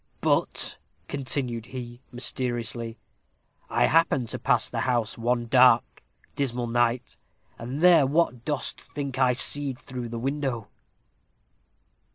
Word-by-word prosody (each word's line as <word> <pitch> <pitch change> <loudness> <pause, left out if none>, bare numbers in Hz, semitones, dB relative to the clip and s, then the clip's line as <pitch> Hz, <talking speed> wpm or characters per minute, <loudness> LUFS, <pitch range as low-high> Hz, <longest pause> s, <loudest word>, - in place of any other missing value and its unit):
But," - - 0 0.3
continued 125 -4 -2
he 125 -1 -8
mysteriously, 120 -2 -2 0.7
"I - - +2
happened 150 -7 +2
to - - -3
pass - - +4
the - - -4
house 120 -4 -1
one 120 +1 -1
dark, 125 0 +4 0.3
dismal 125 -3 -1
night, 120 +1 -1 0.4
and 125 +6 -5
there 175 -6 +6
what 140 -5 0
dost 145 0 -3
think 140 -3 -6
I 130 -2 +4
see'd 135 +1 +2
through 125 -2 -7
the 115 - -5
window?" 130 -3 -3
125 Hz, 120 wpm, -26 LUFS, 120-135 Hz, 0.7 s, there